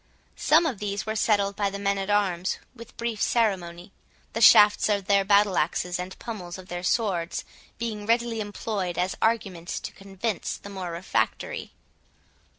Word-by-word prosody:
Some 320 Hz, +3 st, +5 dB
of 260 Hz, -11 st, -2 dB
these 200 Hz, -1 st, -3 dB
were 220 Hz, 0 st, -3 dB
settled 205 Hz, -2 st, +2 dB
by 200 Hz, -1 st, 0 dB
the 200 Hz, -, -5 dB
men 200 Hz, 0 st, 0 dB
at 195 Hz, +1 st, -4 dB
arms 190 Hz, -3 st, +1 dB, 0.2 s
with 230 Hz, 0 st, -13 dB
brief 230 Hz, -2 st, -3 dB
ceremony; 185 Hz, -5 st, 0 dB, 0.4 s
the 230 Hz, -, -2 dB
shafts 210 Hz, -1 st, +7 dB
of 200 Hz, -2 st, +1 dB
their 200 Hz, 0 st, +3 dB
battle 200 Hz, -1 st, +4 dB
axes, 175 Hz, +3 st, -1 dB
and 180 Hz, +1 st, -6 dB
pummels 185 Hz, -7 st, -7 dB
of 185 Hz, 0 st, -12 dB
their 175 Hz, 0 st, -4 dB
swords, 180 Hz, -3 st, -1 dB, 0.3 s
being 215 Hz, -2 st, -4 dB
readily 230 Hz, 0 st, +1 dB
employed 205 Hz, -3 st, -3 dB
as 185 Hz, +1 st, 0 dB
arguments 195 Hz, -6 st, -1 dB
to -, -, -6 dB
convince 195 Hz, +1 st, -4 dB
the 200 Hz, -, -11 dB
more 190 Hz, -3 st, -5 dB
refractory. 170 Hz, +2 st, -2 dB
200 Hz, 160 wpm, -26 LUFS, 185-215 Hz, 0.4 s, shafts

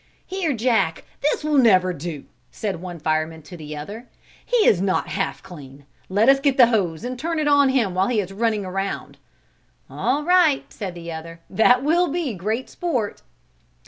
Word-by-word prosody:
"Here, 370 Hz, -4 st, -2 dB
Jack, 220 Hz, -9 st, +1 dB, 0.2 s
this 295 Hz, +1 st, 0 dB
will 300 Hz, -2 st, +2 dB
never 185 Hz, -7 st, +4 dB
do," 155 Hz, -2 st, -6 dB, 0.3 s
said 195 Hz, -6 st, -4 dB
one 180 Hz, -2 st, -7 dB
fireman 155 Hz, 0 st, -2 dB
to 175 Hz, -, -11 dB
the 150 Hz, -2 st, -8 dB
other, 210 Hz, +11 st, -8 dB, 0.4 s
"he 485 Hz, -4 st, +2 dB
is 185 Hz, -, +4 dB
not 190 Hz, -1 st, 0 dB
half 195 Hz, -1 st, -3 dB
clean. 140 Hz, -5 st, -12 dB, 0.2 s
Let 205 Hz, +5 st, +2 dB
us 270 Hz, 0 st, +6 dB
get 275 Hz, -1 st, +1 dB
the 250 Hz, -, +9 dB
hose 200 Hz, -7 st, 0 dB
and 250 Hz, 0 st, -5 dB
turn 330 Hz, +3 st, -2 dB
it 305 Hz, -1 st, 0 dB
on 285 Hz, -1 st, +5 dB
him 240 Hz, -8 st, +1 dB
while 185 Hz, +1 st, +1 dB
he 240 Hz, -3 st, +1 dB
is 195 Hz, -1 st, -4 dB
running 215 Hz, -1 st, 0 dB
around." 195 Hz, +1 st, -4 dB, 0.7 s
"All 290 Hz, +3 st, 0 dB
right," 345 Hz, -4 st, +3 dB
said 190 Hz, -5 st, -6 dB
the 170 Hz, -1 st, -7 dB
other, 165 Hz, +1 st, -8 dB
"that 245 Hz, +6 st, +4 dB
will 340 Hz, +4 st, +3 dB
be 310 Hz, -4 st, -2 dB
great 215 Hz, +7 st, -3 dB
sport." 255 Hz, -, -3 dB
210 Hz, 180 wpm, -22 LUFS, 175-275 Hz, 0.7 s, the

